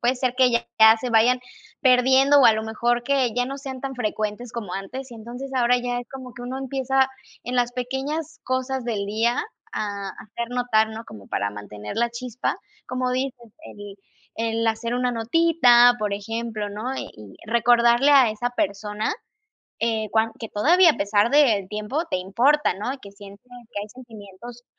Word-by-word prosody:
puede 245 +2 +2
ser 250 -1 -1
que 255 -1 +4
ya 235 - +2 0.4
se 250 - -3
vayan 240 +3 +4 0.4
perdiendo 265 +2 +5
o - - +5
a - - +7
lo 220 0 -2
mejor 235 +2 0
que 265 -3 +1
ya 245 0 0
no 275 +1 -6
sean 265 -2 -7
tan 270 -2 -5
frecuentes 215 +1 -3
como 210 -6 -6
antes, 255 +7 -6
y - - -10
entonces 245 +5 -8
ahora 250 -1 +3
ya 245 0 -2
es 245 -1 -8
como 260 -2 -10
que 240 - -9
uno 250 +2 -5
empieza, 265 0 0 0.3
en 250 +1 -4
las 245 0 +1
pequeñas 280 +6 -4
cosas 260 0 -2
del 215 -4 -2
día 225 - 0 0.3
a 200 -2 -4
hacer 225 +5 -7
notar, 245 -3 +1
¿no? 225 +1 -8
Como 100 - -12
para 100 - -2
mantener 105 0 -8
la 235 +1 +1
chispa, 240 0 -4 0.3
como 255 0 -2
dices, 250 -3 -4
el 205 -5 -10 0.4
el 225 0 -1
hacer 225 +1 -1
una 250 0 0
notita, 245 -1 +5
por 210 -1 -2
ejemplo, 220 +1 -4
¿no? 220 +6 -4
Y 105 - -9
recordarle 235 +3 +4
a 265 -6 +6
esa 240 +3 -3
persona, 210 -1 -2 0.7
eh, 220 -2 -1
cuan 225 0 +1
que 225 - -5
todavía, 335 - +5
a - - -9
pesar 205 +2 +2
del 230 -10 +3
tiempo, 215 +10 -3
te - - +1
importa, 240 +11 +2
¿no? 205 +7 -4
Y - - -12
que 200 -6 -12
sientes 200 +1 -14 0.3
que 205 - -4
hay 210 - -9
sentimientos 235 0 -12
240 Hz, 180 wpm, -23 LUFS, 215-255 Hz, 0.7 s, a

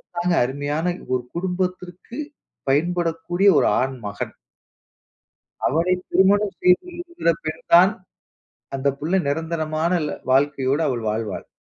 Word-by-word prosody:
அதுதாங்க 175 0 +1
அருமையான 145 +7 -2 0.2
ஒரு 125 - -2
குடும்பத்திற்கு 180 - -4 0.5
பயன்படக்கூடிய 175 +4 +1
ஒரு - - +3
ஆண் 130 0 -2
மகன். 100 - -5 1.3
அவனை 170 +5 +2 0.2
திருமணம் 200 +1 +3
செய்து 180 - +4
இருக்கிற 345 - -1
பெண் 160 +1 -4
தான் 180 +3 +8 0.9
அந்த 135 +1 0
புள்ள 175 +6 +1
நெரந்தரமான 160 +2 -1
ல - - -5
வாழ்க்கையோட 140 +1 +2
அவள் 120 -4 -2
வாழ்வாள். 110 -2 -4
165 Hz, 110 wpm, -22 LUFS, 145-180 Hz, 1.3 s, தான்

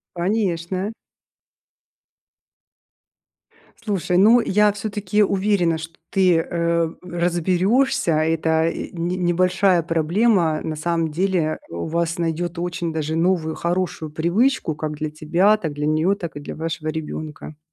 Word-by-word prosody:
Конечно. 185 0 -1 2.8
Слушай, 200 -5 -1
ну, 220 +6 +6
я 210 -1 +3
всё-таки 210 0 -1
уверена, 190 -4 +1
что 160 +1 -8 0.2
ты, 185 -3 +3
э, 170 0 0
разберешься. 180 +5 +1
Эта 160 +1 +1 0.2
не 175 +1 -2
небольшая 180 +1 +2
проблема, 165 +1 +2
на 160 - -3
самом 165 0 -1
деле, 170 -1 0
у 85 0 -5
вас 170 +1 -1
найдет 170 +1 -2
очень 175 -1 -3
даже 160 0 -2
новую 165 -2 +1
хорошую 170 -2 -2
привычку 170 - +1
как 155 0 -4
для 155 0 -4
тебя, 170 +7 +2
так 165 -8 -4
для 150 +1 -2
нее, 155 +5 +2
так 170 -6 -7
и - - -5
для 145 - -7
вашего 160 0 -4
ребенка. 155 -1 -6
170 Hz, 120 wpm, -22 LUFS, 160-190 Hz, 2.8 s, ну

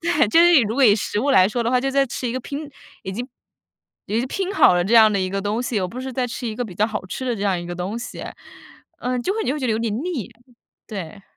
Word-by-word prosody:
对， 335 -8 +2
就 275 - +4
是 345 0 +6
以 295 - +8
如 215 0 -2
果 275 +1 +4
以 210 -4 +7
食 210 -1 -2
物 280 +4 +1
来 190 -9 +6
说 240 +2 -1
的 230 - 0
话， 250 0 +3
就 270 +1 -1
在 275 0 +3
吃 245 0 -4
一 - - -2
个 255 - -2
拼 285 +4 -6 0.3
已 190 - -5
经 240 +6 -4 0.8
已 215 - -1
经 245 - -1
拼 390 +4 -3
好 295 - +6
了 175 0 +1
这 215 +6 +1
样 220 -2 +8
的 200 - +1
一 185 0 -2
个 195 +1 -2
东 210 +4 -1
西， 235 -4 -1
而 185 - -2
不 245 +8 -7
是 260 0 -5
在 255 0 -1
吃 245 +1 -5
一 220 - -3
个 245 +2 -3
比 195 -6 -9
较 210 +4 +2
好 210 -3 -4
吃 260 - -5
的 250 -2 0
这 210 - -7
样 195 -3 +1
一 175 - -7
个 175 - -5
东 185 +6 -4
西。 245 - -7 0.8
嗯， 250 0 -2
就 375 - 0
会 435 - -4
你 - - -3
就 265 - +1
会 - - -3
觉 - - -2
得 230 - +1
有 220 - 0
点 230 -2 -1
腻， 320 - -4 0.6
对。 195 -2 -7
235 Hz, 335 characters per minute, -22 LUFS, 205-265 Hz, 0.8 s, 以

